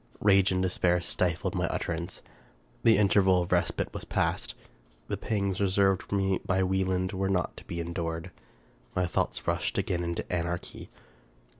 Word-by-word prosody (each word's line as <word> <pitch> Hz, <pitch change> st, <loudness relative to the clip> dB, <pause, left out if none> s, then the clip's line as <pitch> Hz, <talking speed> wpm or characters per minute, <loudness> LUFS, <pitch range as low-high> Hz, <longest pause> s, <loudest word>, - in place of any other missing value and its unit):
Rage 100 Hz, -1 st, +4 dB
and 95 Hz, 0 st, +1 dB
despair 90 Hz, -1 st, +2 dB
stifled 85 Hz, +1 st, -1 dB
my -, -, 0 dB
utterance. 85 Hz, 0 st, -4 dB, 0.6 s
The 115 Hz, -1 st, +5 dB
interval 95 Hz, -3 st, +4 dB
of 85 Hz, -, -8 dB
respite 85 Hz, -1 st, 0 dB
was -, -, -5 dB
past; -, -, -1 dB, 0.5 s
the -, -, -1 dB
pangs 100 Hz, -3 st, -1 dB
reserved 95 Hz, -1 st, +3 dB
for -, -, -4 dB
me 95 Hz, -1 st, +1 dB
by 95 Hz, 0 st, +1 dB
Wieland 95 Hz, 0 st, 0 dB
were 95 Hz, 0 st, -1 dB
not 90 Hz, -2 st, 0 dB
to -, -, -11 dB
be 85 Hz, -, -5 dB
endured; 85 Hz, -1 st, -3 dB, 0.6 s
my 90 Hz, -, +2 dB
thoughts 85 Hz, -, -1 dB
rushed -, -, 0 dB
again 95 Hz, -3 st, 0 dB
into 85 Hz, 0 st, -3 dB
anarchy. 85 Hz, 0 st, -3 dB
95 Hz, 155 wpm, -29 LUFS, 85-95 Hz, 0.6 s, The